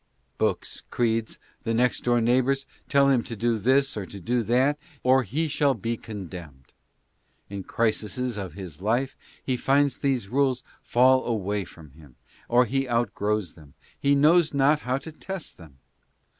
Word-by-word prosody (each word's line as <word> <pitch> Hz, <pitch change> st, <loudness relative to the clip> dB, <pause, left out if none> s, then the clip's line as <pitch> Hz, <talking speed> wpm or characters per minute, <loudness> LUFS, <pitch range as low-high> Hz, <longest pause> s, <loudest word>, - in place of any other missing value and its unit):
Books, -, -, -1 dB
creeds 115 Hz, -2 st, 0 dB, 0.3 s
and 115 Hz, 0 st, 0 dB
next 125 Hz, 0 st, +2 dB
door 120 Hz, -1 st, +3 dB
neighbors 130 Hz, +3 st, +2 dB, 0.2 s
tell 140 Hz, -1 st, +4 dB
him 130 Hz, -3 st, +3 dB
to 115 Hz, -, -7 dB
do 115 Hz, +1 st, 0 dB
this 135 Hz, +6 st, +2 dB
or 100 Hz, -3 st, -4 dB
to 100 Hz, -, -9 dB
do 120 Hz, +7 st, 0 dB
that, 130 Hz, +6 st, +2 dB, 0.2 s
or 130 Hz, +1 st, +5 dB
he 145 Hz, -, -1 dB
shall 145 Hz, -2 st, +2 dB
be 115 Hz, 0 st, -2 dB
condemned. 90 Hz, -, -9 dB, 0.8 s
In 100 Hz, -1 st, -4 dB
crises 115 Hz, +3 st, -1 dB
of 95 Hz, -5 st, -5 dB
his 90 Hz, -5 st, -9 dB
life 120 Hz, +6 st, 0 dB, 0.3 s
he 130 Hz, -, 0 dB
finds 140 Hz, +2 st, +2 dB
these 130 Hz, -7 st, 0 dB
rules 130 Hz, +1 st, +1 dB, 0.2 s
fall 130 Hz, +2 st, +4 dB
away 105 Hz, -3 st, -1 dB
from 80 Hz, -4 st, -14 dB
him, 70 Hz, -3 st, -17 dB, 0.3 s
or 125 Hz, +1 st, +5 dB
he 135 Hz, +2 st, -1 dB
outgrows 105 Hz, -5 st, 0 dB
them; 75 Hz, -4 st, -17 dB, 0.2 s
he 140 Hz, 0 st, +3 dB
knows 155 Hz, +2 st, +4 dB
not 140 Hz, +2 st, +4 dB
how 125 Hz, -1 st, -1 dB
to 145 Hz, +4 st, -8 dB
test 185 Hz, -, -7 dB
them. 80 Hz, -6 st, -15 dB
120 Hz, 160 wpm, -26 LUFS, 105-135 Hz, 0.8 s, or